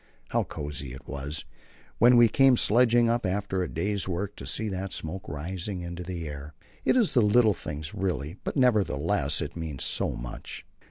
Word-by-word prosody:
How - - +1
cosy 70 -3 -5
it 65 - -11
was, 70 +1 -4 0.5
when 120 +1 +7
we 120 -1 +8
came 135 +2 +5
sledging 120 +1 +4
up 120 +1 +1
after 95 0 -1
the 90 - 0
day's 100 +4 -1
work, 95 +3 -3
to 65 - -8
see 110 +10 -1
that 95 0 -4
smoke 95 +6 -5
rising 90 +6 -4
into 85 0 -6
the 85 -2 -5
air. 75 +1 -8 0.3
It - - +3
is 225 - +3
a 120 - +6
little 110 +1 +5
thing 75 -4 -6
really, 90 -3 -2
but - - -3
nevertheless 120 -7 +2
it - - -5
means 80 -5 -4
so - - 0
much. - - -7
95 Hz, 180 wpm, -27 LUFS, 75-110 Hz, 0.5 s, we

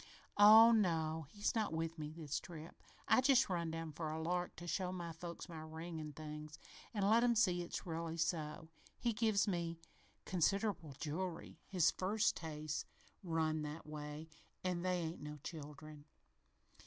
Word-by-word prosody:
"Oh 220 +3 +10
no, 160 -7 +1
he's 205 +3 -1
not 220 -7 0
with 165 0 -2
me 150 0 -4
this 155 -2 -3
trip. 165 -2 -9 0.3
I - - +6
just 265 -2 +5
run 170 -3 -1
down 165 0 -4
for 155 +1 -4
a 160 - -3
lark 175 +2 -1
to 175 - -8
show 180 +1 -1
my 175 -2 -4
folks 170 +2 -7
my 165 -3 -7
ring 160 +1 -6
an' 150 -1 -6
things, 150 0 -7 0.3
an' 205 -3 +1
let 225 +3 +5
'em 240 -1 +4
see 180 -6 +3
it's 175 - -5
really 165 -1 -3
so. 160 -1 -2 0.3
He 235 -1 0
give 215 -2 +2
me 170 -3 -1 0.5
considerable 185 -3 +1
jewelry. 165 +3 -4
His 180 -4 +4
First's 205 +3 +2
taste 155 -1 -4 0.3
run 160 -3 0
that 150 +2 -5
way, 150 +1 -6 0.4
an' 180 -2 0
they 180 -1 0
ain't 165 0 -4
no 150 0 -6
children. 150 -1 -8
165 Hz, 165 wpm, -38 LUFS, 155-185 Hz, 0.5 s, Oh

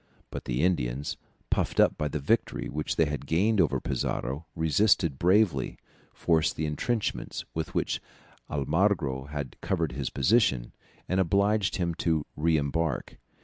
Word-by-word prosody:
But - - -6
the 60 +4 -1
Indians, 70 -6 0 0.4
puffed - - 0
up - - +5
by 75 - -1
the 75 - -3
victory 70 - 0
which 75 +2 -2
they 80 - +4
had 75 -2 -4
gained 100 +6 +3
over 80 - +2
Pizarro, 70 +6 -2
resisted 80 -2 +2
bravely, 90 - +2 0.3
forced 80 -2 +1
the 80 - -2
entrenchments 105 +9 -2
with 80 -1 -4
which - - 0 0.5
Almagro 75 -2 +1
had 70 -3 -6
covered - - 0
his 65 +2 -3
position, 70 - +2 0.4
and 95 - +1
obliged 100 +3 +2
him 85 -2 0
to 80 -3 0
re 80 +1 +2
embark. 75 0 -2
80 Hz, 145 wpm, -28 LUFS, 70-90 Hz, 0.5 s, up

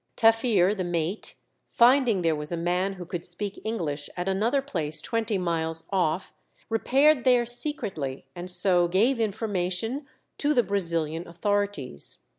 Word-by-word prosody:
Taffir, 225 -4 +4
the 190 - -2
mate, 175 +3 -2 0.3
finding 240 -5 +4
there 165 -1 +2
was 150 +1 -4
a 170 - -1
man 180 +3 0
who 180 -2 -8
could 175 -1 -5
speak 195 +3 -4
English 160 -10 -3
at 180 +1 -3
another 215 +8 +2
place 165 - -2
twenty 225 -2 0
miles 165 -2 -2
off, 180 -2 0 0.4
repaired 265 +5 +3
there 245 -2 +4
secretly, 215 - -3
and 175 +1 -6
so 180 -1 +2
gave 225 +9 +2
information 220 +4 -2 0.3
to 295 +1 +2
the 245 - +4
Brazilian 170 -4 -1
authorities. 180 - -2
190 Hz, 140 wpm, -26 LUFS, 170-225 Hz, 0.4 s, Taffir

